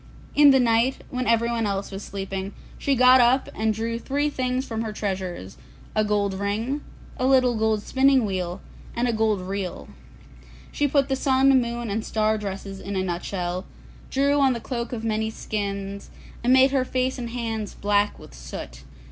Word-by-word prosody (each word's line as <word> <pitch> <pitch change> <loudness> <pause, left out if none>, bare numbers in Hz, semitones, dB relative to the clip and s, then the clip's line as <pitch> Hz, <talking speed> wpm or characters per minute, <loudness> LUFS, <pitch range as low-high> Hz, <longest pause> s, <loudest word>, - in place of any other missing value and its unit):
In 290 0 +7
the 265 -1 +6
night, 235 +2 +2
when 255 0 -2
everyone 230 -1 +2
else 200 0 -3
was 195 0 -6
sleeping, 195 -1 -5 0.3
she 280 - +1
got 255 +1 +7
up 250 +3 +3
and 220 0 0
took 230 +1 -3
three 290 +2 0
things 255 0 -1
from 225 -3 -3
her 220 -1 -3
treasures, 185 - -4 0.4
a 215 - +3
gold 205 -2 0
ring, 215 +9 -2 0.4
a 255 - +1
little 255 -2 +4
gold 220 -1 +1
spinning 265 -1 +3
wheel, 185 -2 -3 0.3
and 240 +1 +1
a 235 - +1
gold 220 -3 +1
reel; 190 0 -5 0.8
she 290 - +1
put 280 -1 +2
the 270 - 0
sun, 265 0 +4
moon, 235 -2 -3
and 220 +2 -1
star 215 0 0
dresses 195 -1 -6
in 200 +1 -5
a 190 - 0
nut 175 -1 -3
shell, 180 -1 -3 0.4
drew 280 +2 +2
on 270 -2 +4
the 235 - -4
cloak 235 -1 -4
of 230 -3 -4
many 220 0 0
skins, 200 -2 -4 0.3
and 245 - +3
made 260 +1 +6
her 270 -2 +2
face 255 0 -1
and 240 -1 -4
hands 225 -3 -4
black 205 0 +1
with - - -14
soot. - - -8
225 Hz, 180 wpm, -24 LUFS, 200-255 Hz, 0.8 s, In